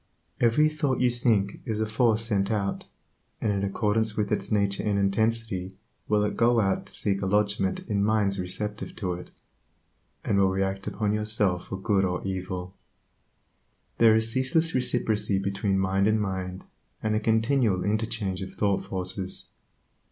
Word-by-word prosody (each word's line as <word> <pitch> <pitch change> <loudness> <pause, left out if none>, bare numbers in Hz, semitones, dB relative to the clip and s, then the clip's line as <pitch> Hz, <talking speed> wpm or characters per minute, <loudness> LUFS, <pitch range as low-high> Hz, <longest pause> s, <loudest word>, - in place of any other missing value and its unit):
Every 120 +6 +4
thought 150 -4 -1
you 125 -1 +3
think 110 -5 +1
is 110 -4 -3
a 110 - +1
force 115 0 +2
sent 100 -3 0
out, 100 -3 -2 0.5
and 105 - 0
in 100 0 -1
accordance 105 +2 0
with 105 -1 -1
its - - -2
nature 100 -2 +2
and 105 -2 0
intensity 100 -2 0 0.3
will 105 -1 +2
it 105 -1 -1
go 120 0 +3
out 95 -3 0
to - - -10
seek 100 -1 0
a 95 - -1
lodgment 100 -1 +1
in 100 -2 +1
minds 105 -2 +1
receptive 105 +4 -3
to 90 -4 -2
it, 90 +1 -8 0.9
and 100 - +1
will 95 -1 +4
react 95 0 -2
upon 105 -2 -1
yourself 105 -4 +1
for 95 - -4
good 100 -1 +2
or 90 0 -2
evil. 95 -1 -4 1.3
There 115 -1 +7
is 110 0 +2
ceaseless 135 +6 +1
reciprocity 110 -5 +1
between 100 0 0
mind 95 +1 +2
and 110 0 +2
mind, 95 -2 -3 0.4
and 110 0 +1
a 110 - +2
continual 110 -2 +2
interchange 105 -2 -1
of 95 - -7
thought 100 -2 +1
forces. 95 0 -5
105 Hz, 160 wpm, -26 LUFS, 95-110 Hz, 1.3 s, There